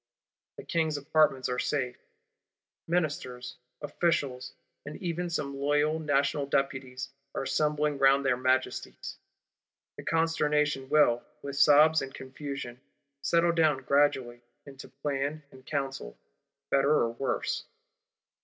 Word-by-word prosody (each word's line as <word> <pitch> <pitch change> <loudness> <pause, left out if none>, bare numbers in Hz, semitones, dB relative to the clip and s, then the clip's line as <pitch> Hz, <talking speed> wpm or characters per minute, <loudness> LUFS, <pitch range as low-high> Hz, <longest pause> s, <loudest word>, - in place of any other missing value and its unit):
The - - -8
King's 160 -3 0
Apartments 145 -2 +2
are 125 0 -2
safe. 125 -4 -1 0.9
Ministers, 135 -7 -2 0.3
Officials, 145 -4 -1 0.3
and 145 +1 -8
even 175 -1 -3
some 145 -4 -3
loyal 145 +3 +1
National 145 -1 +1
deputies 135 -1 -2 0.3
are - - -1
assembling 150 0 0
round 135 +1 +4
their 130 -2 +3
Majesties. 130 +1 -1 0.8
The - - -8
consternation 150 -4 +1
will, 120 -6 +4 0.2
with 140 0 -5
sobs 150 +3 +6
and 135 0 -5
confusion, 130 -2 -7 0.4
settle 170 +4 +3
down 155 -5 +2
gradually, 130 -4 +1 0.2
into 135 -1 -11
plan 140 +2 -3
and 130 0 -15
counsel, 135 - -4 0.5
better 140 +1 +3
or 135 -6 +3
worse. 130 +3 -2
140 Hz, 115 wpm, -29 LUFS, 130-150 Hz, 0.9 s, sobs